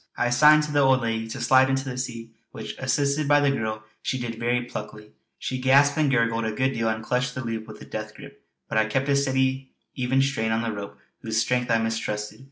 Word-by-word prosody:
I 120 Hz, -, +1 dB
signed 150 Hz, +4 st, +6 dB
to 150 Hz, -, -4 dB
the 145 Hz, -, +2 dB
old 135 Hz, -1 st, +4 dB
lady 115 Hz, -1 st, -2 dB
to 125 Hz, +4 st, -6 dB
slide 130 Hz, +2 st, +4 dB
into 135 Hz, 0 st, -1 dB
the 125 Hz, -, -4 dB
sea 115 Hz, -2 st, -5 dB, 0.2 s
which, -, -, -7 dB
assisted 145 Hz, +1 st, 0 dB
by 145 Hz, 0 st, +5 dB
the 140 Hz, -1 st, +3 dB
girl, 110 Hz, -4 st, -3 dB, 0.2 s
she 130 Hz, -, -2 dB
did 115 Hz, -2 st, -5 dB
very 120 Hz, +1 st, 0 dB
pluckily. 105 Hz, -3 st, -8 dB, 0.3 s
She 130 Hz, -1 st, -4 dB
gasped 140 Hz, +2 st, +5 dB
and 155 Hz, -2 st, +2 dB
gurgled 115 Hz, -3 st, +1 dB
a 110 Hz, -, -1 dB
good 130 Hz, +4 st, 0 dB
deal 115 Hz, -2 st, 0 dB
and 110 Hz, 0 st, -3 dB
clutched 125 Hz, +1 st, -1 dB
the 130 Hz, -, -4 dB
loop 115 Hz, -1 st, -4 dB
with 110 Hz, -, -11 dB
a -, -, -11 dB
death -, -, -6 dB
grip; -, -, -13 dB, 0.2 s
but 110 Hz, -, 0 dB
I 110 Hz, -, +2 dB
kept 135 Hz, +5 st, -1 dB
a 140 Hz, -, +3 dB
steady 130 Hz, -1 st, 0 dB, 0.2 s
even 130 Hz, +1 st, +1 dB
strain 110 Hz, -5 st, -1 dB
on 115 Hz, +1 st, 0 dB
the 115 Hz, -, -2 dB
rope 100 Hz, 0 st, -8 dB, 0.2 s
whose 110 Hz, -1 st, -3 dB
strength 125 Hz, +2 st, 0 dB
I 115 Hz, -, +4 dB
mistrusted. 110 Hz, -1 st, -3 dB
125 Hz, 235 wpm, -25 LUFS, 115-135 Hz, 0.3 s, signed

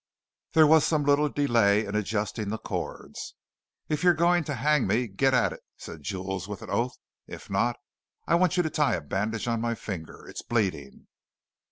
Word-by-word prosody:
There 160 Hz, -1 st, +7 dB
was 155 Hz, 0 st, +6 dB
some 155 Hz, -2 st, +1 dB
little 145 Hz, +1 st, +3 dB
delay 115 Hz, -7 st, +3 dB
in 100 Hz, -, -6 dB
adjusting 105 Hz, 0 st, -2 dB
the 110 Hz, -, -2 dB
cords. -, -, -6 dB, 0.5 s
"If 150 Hz, -, -1 dB
you're 175 Hz, -1 st, +5 dB
going 175 Hz, +1 st, +3 dB
to 145 Hz, -, -3 dB
hang 145 Hz, +2 st, +2 dB
me, 120 Hz, +2 st, +2 dB
get 110 Hz, +7 st, +1 dB
at 125 Hz, -, +2 dB
it!" -, -, -11 dB, 0.2 s
said 80 Hz, -, -9 dB
Jules 95 Hz, +3 st, -4 dB
with 105 Hz, -2 st, -7 dB
an -, -, -8 dB
oath; 125 Hz, +1 st, -1 dB, 0.3 s
"if -, -, -10 dB
not, -, -, +1 dB, 0.5 s
I -, -, 0 dB
want 180 Hz, +1 st, +3 dB
you 180 Hz, -, +4 dB
to 160 Hz, -, -2 dB
tie 145 Hz, -7 st, +2 dB
a 85 Hz, -, -4 dB
bandage 105 Hz, +9 st, -2 dB
on 115 Hz, -1 st, 0 dB
my 115 Hz, 0 st, -1 dB
finger; 90 Hz, -8 st, -7 dB
it's -, -, -7 dB
bleeding." 110 Hz, -6 st, -2 dB
120 Hz, 190 wpm, -27 LUFS, 100-150 Hz, 0.5 s, There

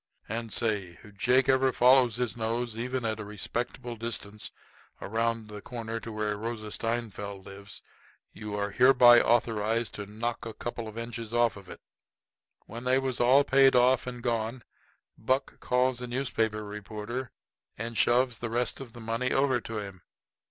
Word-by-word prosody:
And 115 Hz, +1 st, -4 dB
say 100 Hz, -7 st, -1 dB
if 105 Hz, -1 st, -15 dB
Jakey 125 Hz, +5 st, +3 dB
ever 130 Hz, 0 st, +3 dB
follows 125 Hz, -2 st, +5 dB
his 120 Hz, -4 st, -2 dB
nose, 115 Hz, 0 st, -2 dB
even 125 Hz, +1 st, -3 dB
at 110 Hz, -1 st, -1 dB
a -, -, -4 dB
respectful 120 Hz, +4 st, -4 dB
distance, 105 Hz, -2 st, -5 dB, 0.5 s
around 115 Hz, +1 st, -1 dB
the 105 Hz, -1 st, -8 dB
corner 115 Hz, -1 st, -5 dB
where 105 Hz, -2 st, -3 dB
Rosa 110 Hz, -1 st, -5 dB
Steinfeld 105 Hz, -4 st, -3 dB
lives, 100 Hz, +1 st, -10 dB, 0.5 s
you 105 Hz, -1 st, -6 dB
are 100 Hz, 0 st, -2 dB
hereby 120 Hz, 0 st, +7 dB
authorized 115 Hz, -1 st, +1 dB
to 100 Hz, -1 st, -6 dB
knock 115 Hz, +3 st, -3 dB
a 115 Hz, -1 st, -6 dB
couple 120 Hz, -1 st, -5 dB
of 110 Hz, +1 st, -9 dB
inches 115 Hz, -1 st, -5 dB
of 120 Hz, -2 st, +3 dB
it 100 Hz, -2 st, -10 dB
off." -, -, -14 dB, 0.9 s
When 115 Hz, +3 st, -8 dB
they 130 Hz, +1 st, +3 dB
was 130 Hz, -2 st, -2 dB
all 130 Hz, +4 st, +6 dB
paid 135 Hz, -1 st, +5 dB
off 125 Hz, +1 st, +4 dB
and 125 Hz, -1 st, -6 dB
gone, 115 Hz, 0 st, -1 dB, 0.6 s
Buck 130 Hz, +4 st, -1 dB
calls 125 Hz, 0 st, +1 dB
the 125 Hz, -, -5 dB
newspaper 115 Hz, -4 st, -1 dB
reporter 105 Hz, +4 st, -6 dB, 0.5 s
and 115 Hz, +2 st, -5 dB
shoves 120 Hz, +1 st, +2 dB
the 120 Hz, -, -3 dB
rest 120 Hz, +3 st, -1 dB
of 120 Hz, -4 st, -10 dB
the 120 Hz, -, -10 dB
money 115 Hz, +3 st, -1 dB
over 135 Hz, -3 st, +2 dB
to 115 Hz, -1 st, -6 dB
him. 100 Hz, -3 st, -7 dB
115 Hz, 165 wpm, -29 LUFS, 110-125 Hz, 0.9 s, hereby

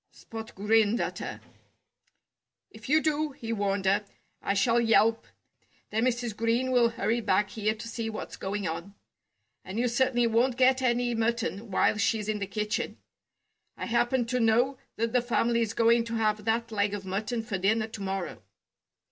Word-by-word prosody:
Spot 225 Hz, -1 st, -10 dB
grinned 215 Hz, +2 st, +3 dB
at -, -, -2 dB
her. -, -, -6 dB, 1.3 s
"If -, -, -11 dB
you 310 Hz, +2 st, +5 dB
do," 305 Hz, -1 st, 0 dB
he 230 Hz, -3 st, -5 dB
warned 200 Hz, -2 st, -1 dB
her, 200 Hz, +2 st, +3 dB, 0.4 s
"I 200 Hz, -, 0 dB
shall 235 Hz, +4 st, +3 dB
yelp. 225 Hz, 0 st, +3 dB, 0.6 s
Then 220 Hz, +3 st, +1 dB
Mrs. 240 Hz, -3 st, -1 dB
Green 230 Hz, +4 st, +1 dB
will 240 Hz, -2 st, +4 dB
hurry 230 Hz, 0 st, -1 dB
back 200 Hz, -1 st, +1 dB
here 215 Hz, 0 st, -1 dB
to 220 Hz, +1 st, -8 dB
see 230 Hz, -1 st, -4 dB
what's 215 Hz, -, -6 dB
going 200 Hz, 0 st, -3 dB
on. 170 Hz, +5 st, -5 dB, 0.7 s
And 190 Hz, +3 st, -7 dB
you 245 Hz, +1 st, +2 dB
certainly 240 Hz, 0 st, +2 dB
won't 235 Hz, +2 st, +2 dB
get 260 Hz, 0 st, +4 dB
any 245 Hz, -1 st, +1 dB
mutton 225 Hz, -2 st, -1 dB
while 200 Hz, +2 st, +2 dB
she's 215 Hz, -1 st, +1 dB
in 215 Hz, -1 st, -1 dB
the 200 Hz, -, -3 dB
kitchen. 210 Hz, +2 st, -2 dB, 0.8 s
I -, -, -4 dB
happen 240 Hz, +1 st, +1 dB
to 250 Hz, +2 st, -1 dB
know 240 Hz, +4 st, +2 dB, 0.2 s
that 230 Hz, +1 st, -1 dB
the 250 Hz, -, +4 dB
family's 235 Hz, -2 st, +1 dB
going 230 Hz, 0 st, +4 dB
to 230 Hz, 0 st, -4 dB
have 215 Hz, -2 st, 0 dB
that 230 Hz, +1 st, 0 dB
leg 205 Hz, -1 st, 0 dB
of 195 Hz, -1 st, -7 dB
mutton 210 Hz, +5 st, -2 dB
for 195 Hz, -3 st, -3 dB
dinner 215 Hz, +4 st, +2 dB
to 220 Hz, -2 st, -8 dB
morrow." 190 Hz, -, -4 dB
225 Hz, 175 wpm, -28 LUFS, 210-240 Hz, 1.3 s, you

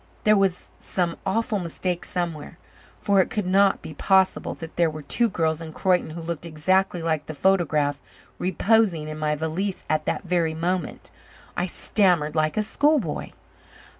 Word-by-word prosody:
There 215 Hz, 0 st, +5 dB
was 195 Hz, -3 st, 0 dB
some 175 Hz, -3 st, -1 dB
awful 220 Hz, +2 st, 0 dB
mistake 175 Hz, 0 st, -3 dB
somewhere, 165 Hz, -3 st, -4 dB, 0.4 s
for 200 Hz, -1 st, +3 dB
it -, -, -1 dB
could 210 Hz, -3 st, -2 dB
not 195 Hz, +2 st, +3 dB
be 155 Hz, -, -7 dB
possible 190 Hz, +4 st, +2 dB
that 165 Hz, -2 st, -9 dB
there 170 Hz, -2 st, +3 dB
were 155 Hz, -1 st, -8 dB
two 235 Hz, +9 st, +2 dB
girls 160 Hz, -3 st, 0 dB
in 160 Hz, -1 st, -8 dB
Croyden 180 Hz, -2 st, +1 dB
who 165 Hz, +1 st, -7 dB
looked 170 Hz, -1 st, -4 dB
exactly 175 Hz, +2 st, 0 dB
like 155 Hz, -2 st, -1 dB
the 155 Hz, -, -6 dB
photograph 150 Hz, -5 st, +1 dB, 0.4 s
reposing 185 Hz, -3 st, +2 dB
in 155 Hz, 0 st, -6 dB
my 150 Hz, 0 st, 0 dB
valise 165 Hz, +6 st, -3 dB
at 155 Hz, -1 st, 0 dB
that -, -, -1 dB
very 170 Hz, -3 st, 0 dB
moment. 175 Hz, +1 st, -3 dB, 0.4 s
I 180 Hz, -, -1 dB
stammered 175 Hz, -5 st, +1 dB
like 155 Hz, +2 st, +1 dB
a 215 Hz, -, +2 dB
schoolboy. 275 Hz, -, 0 dB
175 Hz, 165 wpm, -24 LUFS, 155-190 Hz, 0.4 s, There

